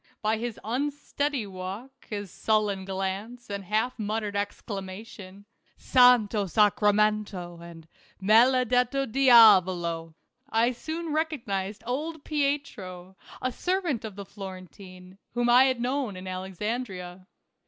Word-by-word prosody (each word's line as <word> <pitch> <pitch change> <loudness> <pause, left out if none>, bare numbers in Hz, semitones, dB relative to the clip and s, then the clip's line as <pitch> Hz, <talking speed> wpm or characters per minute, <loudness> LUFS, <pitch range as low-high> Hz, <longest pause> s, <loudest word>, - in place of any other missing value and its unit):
By 215 +1 +1
his 235 -1 -4
unsteady 285 +1 -2
walk, 195 +8 -8
his 205 -3 -5
sullen 210 -3 0
glance, 195 +5 -4
and 200 0 -4
half 220 +5 -1
muttered 210 -1 -2
exclamation 200 -1 -6
— - - -48
" - - -38
Santo 235 -5 +4
Sacramento," 210 -2 +1
and 165 -1 -12 0.2
" - - -32
Maledetto 250 +5 +3
diavolo 185 -10 +5
" - - -53
— - - -47
I 230 +2 +2
soon 315 +5 -5
recognized 220 -11 -2
old 295 +5 -4
Pietro, 245 - -3 0.3
a 255 - 0
servant 350 - -1
of 215 -3 -7
the 200 0 -7
Florentine, 185 -1 -11 0.2
whom 240 0 +2
I 250 +2 +7
had 260 -2 +1
known 250 -3 -1
in 185 +1 -8
Alexandria. 185 0 -5
215 Hz, 125 wpm, -27 LUFS, 190-250 Hz, 0.3 s, I